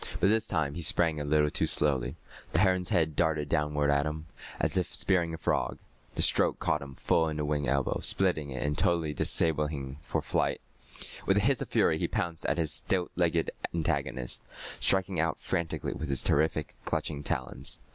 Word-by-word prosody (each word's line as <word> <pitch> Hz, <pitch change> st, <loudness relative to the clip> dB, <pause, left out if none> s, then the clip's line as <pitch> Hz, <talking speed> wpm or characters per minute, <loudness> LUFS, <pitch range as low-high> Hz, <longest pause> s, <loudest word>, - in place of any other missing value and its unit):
But 95 Hz, -, +4 dB
this 110 Hz, 0 st, +2 dB
time 80 Hz, -6 st, -1 dB
he 85 Hz, -, -5 dB
sprang 85 Hz, -2 st, +2 dB
a -, -, -2 dB
little 75 Hz, 0 st, +2 dB
too -, -, +1 dB
slowly. 70 Hz, -5 st, +1 dB, 0.4 s
The 80 Hz, -, +3 dB
heron's 95 Hz, -2 st, +2 dB
head 80 Hz, -3 st, +1 dB
darted 75 Hz, -3 st, +1 dB
downward 75 Hz, -2 st, +1 dB
at 70 Hz, +1 st, +2 dB
him, 75 Hz, +1 st, -5 dB, 0.3 s
as -, -, +1 dB
if 90 Hz, -2 st, -1 dB
spearing 85 Hz, -3 st, +2 dB
a 80 Hz, -, -5 dB
frog. -, -, -1 dB, 0.4 s
The -, -, +3 dB
stroke -, -, +4 dB
caught -, -, 0 dB
him 70 Hz, -1 st, -9 dB
full 80 Hz, +4 st, +1 dB
in 75 Hz, -, -4 dB
the 75 Hz, -, -1 dB
wing 75 Hz, -2 st, -1 dB
elbow, 70 Hz, +1 st, 0 dB
splitting 90 Hz, -7 st, +1 dB
it 65 Hz, -1 st, -4 dB
and 75 Hz, 0 st, 0 dB
totally 80 Hz, -1 st, +1 dB
disabling 75 Hz, +1 st, +1 dB
him 70 Hz, -2 st, -6 dB
for -, -, -2 dB
flight. -, -, 0 dB, 0.7 s
With 95 Hz, -, +4 dB
a -, -, +4 dB
hiss 135 Hz, +4 st, +2 dB
of -, -, -3 dB
fury, -, -, +2 dB
he -, -, 0 dB
pounced 85 Hz, -2 st, -3 dB
at -, -, +1 dB
his 80 Hz, -3 st, 0 dB
stilt 90 Hz, -2 st, -1 dB
legged 85 Hz, -2 st, +1 dB, 0.2 s
antagonist, 70 Hz, -6 st, -1 dB, 0.4 s
striking 95 Hz, -2 st, +3 dB
out 80 Hz, 0 st, 0 dB
frantically 85 Hz, -1 st, -2 dB
with 80 Hz, -, -5 dB
his 70 Hz, -2 st, +1 dB
terrific, 80 Hz, 0 st, +1 dB
clutching 75 Hz, -2 st, -2 dB
talons. 65 Hz, -3 st, -1 dB
80 Hz, 195 wpm, -29 LUFS, 75-85 Hz, 0.7 s, But